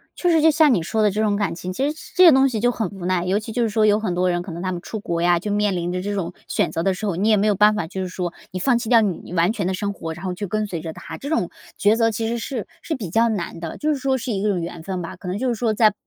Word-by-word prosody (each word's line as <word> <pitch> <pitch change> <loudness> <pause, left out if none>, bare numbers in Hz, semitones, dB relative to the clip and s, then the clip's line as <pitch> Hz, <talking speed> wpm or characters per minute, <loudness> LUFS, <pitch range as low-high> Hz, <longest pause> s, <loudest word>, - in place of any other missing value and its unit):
确 355 - 0
实 325 -2 +4
就 320 0 +6
像 305 -3 +5
你 175 - +1
说 220 +5 -1
的 210 -2 +4
这 215 +2 -1
种 210 -2 +2
感 195 -5 -1
情， 185 +1 -5
其 275 +8 0
实 305 - -4 0.2
这 370 - +6
些 330 - +10
东 265 0 +5
西 225 -3 -2
就 245 +2 +3
很 220 -6 -2
无 195 -3 -8
奈。 180 -1 0
尤 195 +3 +1
其 220 +1 -8
就 240 +1 0
是 225 - +1
说 215 0 +2
有 210 0 +4
很 200 -5 -2
多 180 0 +2
人 175 0 0
可 175 -1 -7
能 170 +1 -6
他 185 - -1
们 175 -1 -4
出 220 +3 -6
国 170 -4 -2
呀， 175 0 +3
就 205 +3 -4
面 205 -2 +1
临 175 0 -2
着 180 0 -2
这 205 +1 -3
种 180 -3 -3
选 - - 0
择 165 - -2
的 195 - +2
时 210 +4 -5
候， 190 -5 -1
你 205 +5 +1
也 215 - +5
没 210 +2 +2
有 205 - +3
办 210 +2 +5
法， 165 -6 -2
就 190 +3 -5
是 185 - -2
说 180 -1 -4 0.2
你 185 - -4
放 245 +4 +3
弃 230 - -4
掉 230 -2 +6
你 180 -3 -3
完 175 +3 +3
全 200 -6 -2
的 190 - 0
生 200 +2 -2
活， 165 -3 -6
然 175 +3 -9
后 180 - -2
去 205 +2 -5
跟 215 +2 -1
随 170 -5 -4
着 160 -1 -6
他， - - -8
这 285 - -6
种 315 - 0 0.3
抉 210 +2 +4
择 225 -1 +2
其 225 +1 -2
实 235 +1 -1
是 235 -2 -4
是 320 - -3
比 205 -9 -5
较 230 +5 +3
难 175 -5 -3
的。 165 -1 -6
就 305 0 +1
是 275 - -3
说 265 -1 +1
是 245 0 -4
一 195 -2 -1
个 205 -4 +1
缘 170 -1 -6
分 185 -1 -4
吧， 165 - -6
可 185 - -11
能 185 +3 -2
就 260 +3 -1
是 235 - 0
说 220 -1 0
在 215 -1 +4
205 Hz, 375 characters per minute, -22 LUFS, 180-225 Hz, 0.3 s, 些